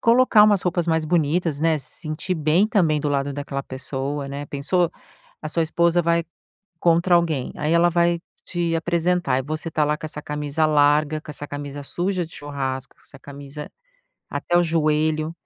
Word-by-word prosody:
colocar 235 -2 +6
umas 205 -3 +3
roupas 175 -1 0
mais 160 -1 +1
bonitas, 160 -1 +1
né, 160 -1 +2
se - - -8
sentir 155 +3 -3
bem 160 +5 +3
também 170 -10 +2
do 150 - -1
lado 140 0 0
daquela 140 -1 -4
pessoa, 135 +2 -4
né, 140 +1 -5
pensou, 150 +6 0 0.5
a 155 - -4
sua 165 +2 0
esposa 170 +2 +2
vai 170 0 +2 0.6
contra 170 +1 +3
alguém 160 -6 +1
aí 150 +2 0
ela 170 +1 +5
vai 170 0 +2 0.2
te 170 -2 -1
apresentar 170 -4 +1
e - - -1
você 155 +3 -4
está 155 -1 +1
lá 150 +1 0
com 160 - -7
essa 150 -1 -7
camisa 150 +1 -1
larga, 150 0 +3
com - - -14
essa 145 0 -7
camisa 145 0 -6
suja 180 +4 -2
de 160 - -16
churrasco, 135 -3 -5
essa 135 - -16
camisa 140 +1 -9 0.6
até 175 - -1
o - - +4
joelho, 155 -1 +1
155 Hz, 180 wpm, -23 LUFS, 145-170 Hz, 0.6 s, colocar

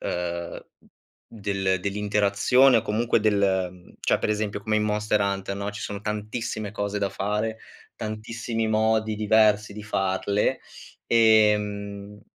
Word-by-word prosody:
uhm, 85 -1 -4 0.6
del 100 -3 -1
dell'interazione 105 +6 +3
o - - -2
comunque 115 +3 +1
del 105 -2 +2
ehm, 95 -2 -1
cioè - - +2
per - - -2
esempio 105 -1 -1
come 110 +1 0
in 105 - +1
Monster 105 0 0
Hunter 100 0 -2
no, 100 +1 -3
ci 105 - -8
sono 100 -1 -5
tantissime 105 0 -4
cose 105 -1 -2
da 100 -1 0
fare, 105 +3 -2 0.4
tantissimi 115 +1 -3
modi 110 0 +1
diversi 105 -1 +3
di 105 +1 -8
farle, 100 +4 0 0.5
ehm, 105 -2 +2
105 Hz, 130 wpm, -25 LUFS, 100-110 Hz, 0.6 s, dell'interazione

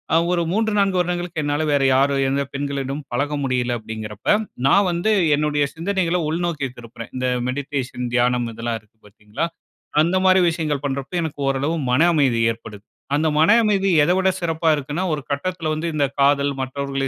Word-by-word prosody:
அ - - +6
ஒரு 175 -1 +1
3, 220 +2 +1
4 195 -2 +2
வருடங்களுக்கு 175 -2 -2
என்னால 145 +1 0
வேற 140 -1 +2
யாரு, 140 +1 +3
எந்த 140 +1 0
பெண்களிடமும் 140 0 -3
பழக 145 +4 -1
முடியல 125 -2 0
அப்படிங்கிறப்ப, 110 -1 -8 0.4
நான் 200 +7 +4
வந்து 175 +5 0 0.2
என்னுடைய 150 -1 +1
சிந்தனைகள 180 0 0
உள்நோக்கி 165 -3 -1
திருப்புறேன். 115 0 -10
இந்த 130 0 -1 0.2
மெடிடேஷன் 130 -2 -4
தியானம் 120 0 +2
இதெல்லாம் 115 0 -3
இருக்கு, 105 +1 -33
பாத்தீங்களா? 105 +8 -4 0.6
அந்த 175 +3 +1
மாரி 185 0 +6
விஷயங்கள் 155 -4 -2
பண்றப்போ, 135 +4 -4
எனக்கு 145 -2 -5
ஓரளவு 140 +4 0 0.2
மன 125 +5 +3
அமைதி 130 -6 +2
ஏற்படுது. 110 -2 -12 0.3
அந்த 155 +2 +1
மன 160 - +5
அமைதி 200 -2 +2
எத 165 - +2
விட 190 0 +3
சிறப்பா 165 -1 -1
இருக்குன்னா, 145 +5 -3
ஒரு 150 - -3
கட்டத்துல 165 +2 -2
வந்து, 160 +2 -3
"இந்த 145 -2 +2 0.2
காதல், 140 0 +3
மற்றவர்களை 135 +1 -3
145 Hz, 165 wpm, -21 LUFS, 130-170 Hz, 0.6 s, அ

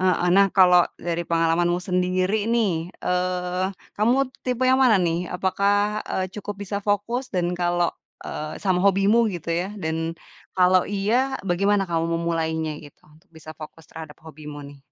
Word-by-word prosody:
heeh 185 -1 +2
nah 200 0 +6
kalau 180 -1 +7 0.3
dari 170 0 -1
pengalamanmu 170 +1 +1
sendiri 185 +3 0
nih, 220 -5 +2 0.3
eee, 180 0 -1 0.3
kamu 250 +5 +2 0.2
tipe 250 0 -1
yang 260 - +4
mana 225 -8 +4
nih? 175 +1 -1
Apakah, 205 +3 +1
eee, 185 -1 -2
cukup 205 0 -5
bisa 200 +1 -3
fokus 205 +5 -1
dan 175 0 -1
kalau, 175 -1 +1 0.3
eee, 155 +1 -5
sama 185 -3 +2
hobimu 200 +4 +4
gitu 170 -1 -5
ya, 170 +2 0 0.2
dan 160 +1 -2 0.4
kalau 185 0 +4
iya, 225 +7 0
bagaimana 195 +1 +1
kamu 165 0 0
memulainya 160 -2 -2
gitu, 145 -2 -15
untuk 155 +1 -23
bisa 155 0 -11
fokus 160 +1 -10
terhadap 160 -2 -9
hobimu 150 -2 -10
nih? 145 - -15
180 Hz, 155 wpm, -23 LUFS, 165-205 Hz, 0.4 s, kalau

